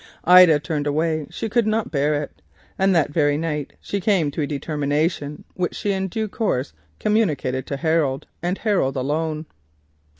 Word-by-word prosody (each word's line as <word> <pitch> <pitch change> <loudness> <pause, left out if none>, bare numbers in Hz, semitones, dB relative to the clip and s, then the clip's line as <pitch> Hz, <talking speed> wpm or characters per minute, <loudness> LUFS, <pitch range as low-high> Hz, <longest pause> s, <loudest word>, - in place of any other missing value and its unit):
She 180 -4 +8
turned 145 +1 -2
away; 155 +1 0
she - - -4
could 230 0 +1
not 215 -3 0
bear 145 0 +1
it, - - -12 0.4
and 190 -1 +3
that 155 -3 +2
very 145 -2 +2
night 150 -3 -3
she 200 - -4
came 180 -8 +2
to 155 - -3
a 145 - 0
determination, 145 +1 -2
which 180 +1 -3
in 190 -1 0
due 220 +4 -2
course 165 - -2
was 80 - -35 0.2
communicated 160 - 0
to 140 - -3
Harold, 150 -3 0 0.2
and 175 +3 -1
him 210 -3 +1
alone. 150 +4 -1
155 Hz, 165 wpm, -22 LUFS, 145-190 Hz, 0.4 s, She